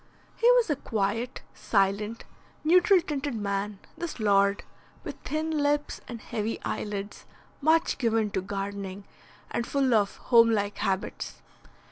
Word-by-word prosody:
He 470 - +4
was - - +4
a - - +2
quiet, 225 0 -2
silent, 205 +2 0 0.4
neutral 360 +3 +5
tinted 290 -5 -3
man, 200 -1 -2 0.2
this 340 -6 -5
lord, 200 -1 +3 0.4
with - - -6
thin 310 +1 -2
lips 295 -1 0
and 235 -2 -6
heavy 220 +1 -3
eyelids, 205 -1 -4 0.4
much 320 +1 +3
given 225 -4 +1
to 190 - -1
gardening, 195 0 -5 0.5
and 235 - -2
full 270 -3 +2
of 205 -3 +2
home 230 -2 +5
like 205 -2 0
habits. 190 0 -3
225 Hz, 130 wpm, -27 LUFS, 200-290 Hz, 0.5 s, neutral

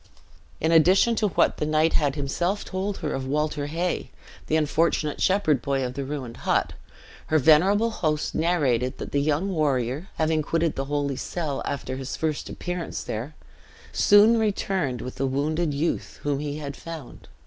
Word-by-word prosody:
In 160 - +1
addition 185 +8 +5
to 215 - +2
what 195 - +2
the - - -1
knight 155 +1 +2
had 145 -3 +1
himself 175 +8 -1
told 195 +1 -3
her - - -1
of 130 -1 -3
Walter 150 +1 -1
Hay, 170 +4 -2 0.4
the 155 - +1
unfortunate 155 0 +1
shepherd 185 -8 +2
boy 135 -1 0
of 125 - -4
the 140 +1 -4
ruined 135 -4 -5
hut, - - 0 0.5
her 155 - +3
venerable 185 - +4
host 155 -8 -1
narrated 140 -7 +1
that - - -7
the 140 - +1
young 155 +6 0
warrior 140 -1 0
having 160 0 +1
quitted 165 +1 0
the 135 - -2
holy 140 -1 -1
cell 155 -6 -3
after 130 -1 -4
his 135 0 -5
first 155 -2 -2
appearance 175 -1 -4
there, 120 +8 -5 0.6
soon 215 +3 +6
returned 190 - -1
with 125 - -7
the 135 - 0
wounded 150 +4 0
youth, 145 +4 -2
whom 145 -1 0
he 145 0 -4
had 140 -2 -6
found. 160 -5 -9
155 Hz, 170 wpm, -25 LUFS, 140-170 Hz, 0.6 s, soon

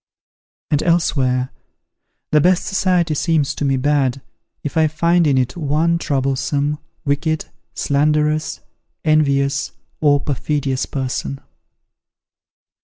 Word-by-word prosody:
And 150 0 +2
elsewhere, 130 -7 +1 0.8
"The 150 - +5
best 180 +2 +3
society 180 -4 +1
seems 150 -2 +1
to - - -5
me 135 -1 +2
bad, 135 -1 +1 0.4
if 145 - -4
I 160 -1 +4
find 170 +2 +2
in 135 -2 +3
it 125 -1 0
one 165 +1 +1
troublesome, 140 +1 -1 0.3
wicked, 155 +2 0 0.3
slanderous, 150 +2 +1 0.4
envious, 140 -2 +2 0.3
or 145 -2 +4
perfidious 140 -1 -2
person." 125 - -3
145 Hz, 105 wpm, -19 LUFS, 135-155 Hz, 0.8 s, The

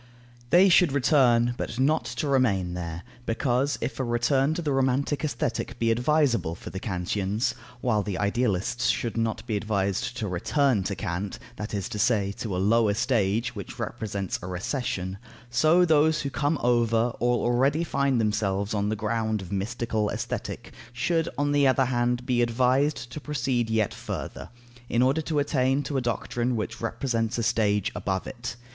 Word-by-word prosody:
They 180 +6 +6
should 180 -3 +5
return, 120 -4 +4
but - - -4
not 135 0 +2
to 120 +6 -3
remain 100 -10 +2
there; 85 -1 -5 0.2
because, 130 +4 +1
if 120 - -3
a - - +1
return 130 +5 +1
to 175 - -2
the 150 - 0
romantic 135 +2 +1
Aesthetic 120 -3 -2
be 115 -1 +2
advisable 125 - +2
for - - -9
the 95 - -5
Kantians 100 +4 -1 0.3
(while 110 -4 +2
the 100 -2 -3
idealists 105 +2 0
should 115 - 0
not 115 -1 -1
be 110 -3 -2
advised 100 +2 -1
to 110 - -2
"return 115 - +1
to 100 - -2
Kant," 95 +3 -4 0.2
that 105 0 -4
is 100 -3 -2
to 105 - -5
say, 105 -3 +2
to 105 -5 -3
a - - -1
lower 105 +2 +3
stage, 110 -1 0
which - - -7
represents 100 -3 -3
a 90 - -6
recession), 95 0 -3 0.3
so 155 +8 +4
those 155 -1 +3
who 140 - -3
come 145 +5 0
over, 120 -1 +2
or 120 0 +1
already 135 +7 +2
find 140 -5 +1
themselves 105 -2 0
on 105 -1 0
the 110 - 0
ground 110 0 -1
of 95 -1 -9
mystical 110 +1 -1
Aesthetic, - - -5 0.2
should, 165 +7 0
on 145 0 +1
the 145 -1 +4
other 130 0 +3
hand 120 0 0
be 125 -1 +1
advised 125 +3 +1
to 150 - -6
proceed 125 -5 -1
yet 110 -2 +1
further, - - -6 0.4
in 120 +1 +3
order 135 +5 +2
to 155 0 -2
attain 140 -1 +1
to 145 - -4
a 135 - +1
doctrine 120 +1 -1
which 110 +1 -4
represents 115 0 -1
a 115 - -1
stage 105 -2 +1
above 95 -1 -2
it. 120 -1 -6
120 Hz, 175 wpm, -26 LUFS, 105-135 Hz, 0.4 s, They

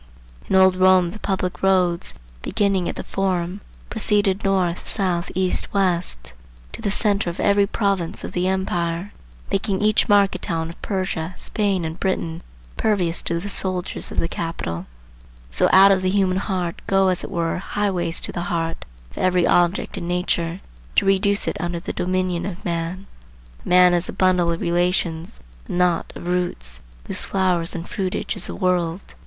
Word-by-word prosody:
In - - +2
old 190 -1 +5
Rome 185 -2 +5
the 215 - -9
public 185 -3 -2
roads 185 -3 +2 0.3
beginning 195 - 0
at - - -4
the - - -5
Forum 185 0 -2 0.3
proceeded 205 -3 +1
north, 185 -3 +1
south, 180 -4 -1
east, 185 0 +1
west, 170 - 0 0.4
to - - -8
the - - -1
centre 205 -2 +1
of 170 - -7
every 200 0 +3
province 195 -5 -1
of - - -5
the 180 +1 0
empire, 180 -1 -1 0.4
making 195 -1 0
each 215 0 +3
market 200 -2 +4
town 165 -1 -2
of 170 - -11
Persia, 185 -3 -2
Spain 200 -5 -1
and 160 +2 -5
Britain 170 -3 -2 0.4
pervious 180 -6 +1
to 170 0 -2
the 195 - -6
soldiers 185 -2 -1
of - - -9
the 165 - +1
capital: 130 - -4 0.6
so - - +2
out 195 +1 +8
of 190 -1 +3
the 185 - +1
human 190 -1 +2
heart 185 -4 -2
go 195 -1 +3
as 185 - -1
it - - -6
were 170 0 -1
highways 190 -4 -1
to - - -5
the 175 - -4
heart 165 -1 -2 0.3
of - - -10
every 180 -1 +3
object 175 +2 +2
in 170 - -5
nature, 175 0 -1 0.3
to - - +4
reduce 200 +1 +3
it - - -1
under 175 -1 -2
the - - -5
dominion 185 -1 -1
of 185 -2 -7
man. 170 +3 -3 0.6
A - - -7
man 180 0 +6
is 175 0 +2
a - - -4
bundle 180 -2 +2
of 165 - -3
relations, 175 - 0 0.3
a - - -4
knot 180 -1 +1
of 175 - -8
roots, 65 - -2 0.2
whose - - +1
flower 185 -3 +1
and 170 0 -5
fruitage 190 -2 -3
is - - -3
the - - -6
world. 180 -1 0
180 Hz, 175 wpm, -22 LUFS, 170-195 Hz, 0.6 s, out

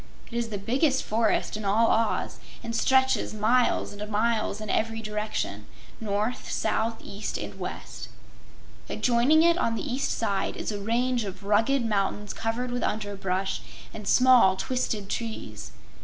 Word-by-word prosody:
It - - -12
is 235 -1 -1
the 210 - -3
biggest 265 +7 +1
forest 220 0 +1
in 215 - -5
all 215 +3 +3
Oz 225 0 0 0.2
and 230 0 -4
stretches 265 -2 +2
miles 230 +1 +2
and 210 +1 -6
miles 220 +1 +1
in 215 - -6
every 225 0 0
direction 210 - -3 0.3
north, 215 +2 -2
south, 225 +1 0
east 205 +2 -5
and - - -7
west. - - -6 0.8
Adjoining 255 +6 +3
it 340 +1 +4
on 230 -7 +1
the - - -4
east 260 +1 -1
side 200 -4 -1
is - - -3
a 205 - -4
range 240 +3 +1
of 195 -1 -7
rugged 225 +6 +2
mountains 205 -1 -1
covered 235 +2 -2
with 245 - -2
underbrush 195 -2 -2 0.3
and 210 -2 -8
small 250 -7 +6
twisted 220 -2 -2
trees. 110 - -5
220 Hz, 150 wpm, -27 LUFS, 205-240 Hz, 0.8 s, small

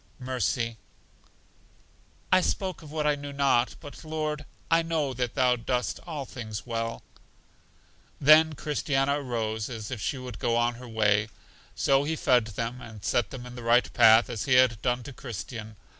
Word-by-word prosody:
Mercy: 125 -3 -2 1.5
I 185 - +6
spoke 185 -1 -2
of 150 -2 -12
what 155 -1 -2
I 150 - +4
knew 145 0 -6
not; 140 -3 +2
but, 145 - -11
Lord, 155 -1 -3 0.3
I 165 0 +5
know 160 -5 -1
that 125 -1 -3
Thou 125 -1 +3
dost 125 +1 -2
all 150 -5 -4
things 110 -5 -7
well. 115 -1 -3 1.2
Then 155 +2 +6
Christiana 140 -1 0
rose 110 -4 -2
as 115 -1 -6
if 115 -5 -4
she 135 - -2
would 125 -3 -8
go 115 - +1
on 120 0 +2
her 120 +1 -11
way. 105 -1 +2 0.5
So 135 0 +3
He 160 +2 -1
fed 125 -6 +3
them, 115 +4 -4
and 110 -4 -10
set 120 -5 +1
them 125 -2 -8
in 125 - -9
the 125 - -8
right 120 +1 +3
path, 110 +1 +7
as 110 - -4
He 130 - +2
had 125 -4 +4
done 125 -1 0
to 140 - -9
Christian. 115 -2 -7
125 Hz, 175 wpm, -27 LUFS, 115-145 Hz, 1.5 s, path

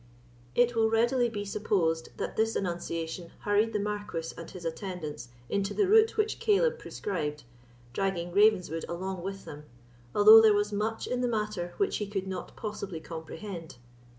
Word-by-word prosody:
It 245 0 +4
will 225 -1 +3
readily 240 +2 +2
be 205 -2 -4
supposed 180 -6 0
that - - -4
this 225 +1 +1
annunciation 170 -2 -3
hurried 210 +2 +2
the - - 0
Marquis 205 -5 -3
and 165 - -9
his 180 -3 -9
attendants 160 - -5 0.2
into 200 +5 -1
the 405 - +3
route 445 +2 +5
which 430 0 0
Caleb 475 +3 +2
prescribed, 150 - -4 0.5
dragging 185 -3 -1
Ravenswood 185 -5 +3
along 185 +1 -4
with 195 +2 -6
them, 150 -2 -9 0.5
although 215 +2 +10
there 215 -2 +6
was 205 0 0
much 215 +2 -1
in 250 0 -2
the 250 - +1
matter 210 -6 -2
which 400 -1 +1
he 210 - -3
could 195 -2 -3
not 190 -2 -6
possibly 200 -5 -5
comprehend. 165 +1 -8
200 Hz, 160 wpm, -29 LUFS, 170-220 Hz, 0.5 s, although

